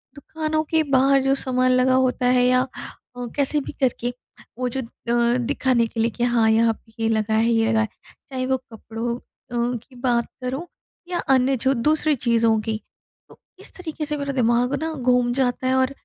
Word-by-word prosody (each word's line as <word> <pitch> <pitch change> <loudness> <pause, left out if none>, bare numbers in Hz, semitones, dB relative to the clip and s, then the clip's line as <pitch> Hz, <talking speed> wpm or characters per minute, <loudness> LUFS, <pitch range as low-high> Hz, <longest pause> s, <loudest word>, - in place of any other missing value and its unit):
दुकानों 310 +2 -2
के 320 -1 +3
बाहर 275 -1 +3
जो 270 0 +3
सामान 255 -1 +1
लगा 255 +1 +3
होता 255 -1 +1
है 250 0 +4
या 255 0 +4
अ, 250 -1 -8
कैसे 290 +1 +3
भी - - -7
करके, 245 -1 0 0.4
वो 250 0 -1
जो 265 +2 -3
अ, 235 +1 0
दिखाने 255 -1 +1
के 225 - -7
लिए 230 +1 +2
कि 240 - -3
हाँ, 235 -2 +3
यहाँ 225 +1 +3
पे 225 0 -23
ये 225 - +2
लगा 220 0 0
है 225 +2 +3
ये 225 -1 +2
लगा 225 -1 +2
है, 220 - 0 0.4
चाहे 255 -1 -3
वो 265 0 +1
कपड़ों 230 -1 -6
अ, 245 -1 -4
की 250 +3 -17
बात 240 -1 +1 0.2
करो 270 +8 -3 0.4
या 350 - -1 0.2
अन्य 260 +1 +2
जो 265 +3 +1
दूसरी 300 +4 +2
चीज़ों 230 -2 +2
की। 220 -1 -2 0.5
तो - - -17 0.2
इस - - -12
तरीके 315 -3 -5
से 300 0 -2
मेरा 280 -1 -3
दिमाग 245 +1 +2
ना 320 - -2
घूम 250 -3 +2
जाता 255 0 0
है 260 - +2
और 260 0 +2
250 Hz, 200 wpm, -22 LUFS, 235-270 Hz, 0.5 s, है